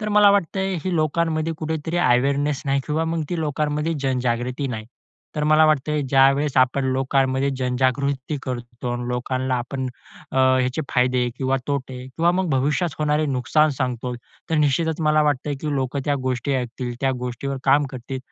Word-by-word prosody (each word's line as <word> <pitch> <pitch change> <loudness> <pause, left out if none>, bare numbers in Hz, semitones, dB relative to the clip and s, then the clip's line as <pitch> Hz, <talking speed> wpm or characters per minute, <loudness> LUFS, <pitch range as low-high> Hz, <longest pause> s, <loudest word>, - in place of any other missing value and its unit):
तर 210 - -2
मला 205 -1 +7
वाटतंय 195 0 0
ही 185 - 0
लोकांमध्ये 160 +1 0
कुठेतरी 160 +1 -3
अवेअरनेस 140 +2 +2
नाही 140 0 +2
किंवा 155 +2 0
मग 165 0 -1
ती 175 - -1
लोकांमध्ये 150 +1 -1
जनजागृती 125 0 -1
नाही. 110 -3 -5 0.5
तर 150 - 0
मला 155 +1 +5
वाटतंय 150 0 +1
ज्यावेळेस 135 +1 +3
आपण 130 +1 +3
लोकांमध्ये 135 0 +1
जनजागृती 130 +3 0
करतो 120 -1 -5
आणि 120 0 -4
लोकांना 130 +1 -1
आपण, 130 +2 -3 0.5
अ, - - -3
ह्याचे 130 +2 +3
फायदे 125 -1 +2
किंवा 135 0 +1
तोटे 130 -3 -3
किंवा 165 +6 +1
मग 185 0 0
भविष्यात 145 +5 +1
होणारे 150 0 +1
नुकसान 145 +3 +2
सांगतो, 125 -2 -2 0.4
तर - - +2
निश्चितच 155 +3 +1
मला 150 0 +4
वाटतंय 145 0 0
की 150 -2 -2
लोक 135 0 -2
त्या 145 - +1
गोष्टी 130 +2 -1
ऐकतील, 125 -1 -3
त्या 135 - +2
गोष्टीवर 125 +2 -4
काम 140 +2 +4
करतील 130 +1 -6
135 Hz, 160 wpm, -22 LUFS, 130-150 Hz, 0.5 s, मला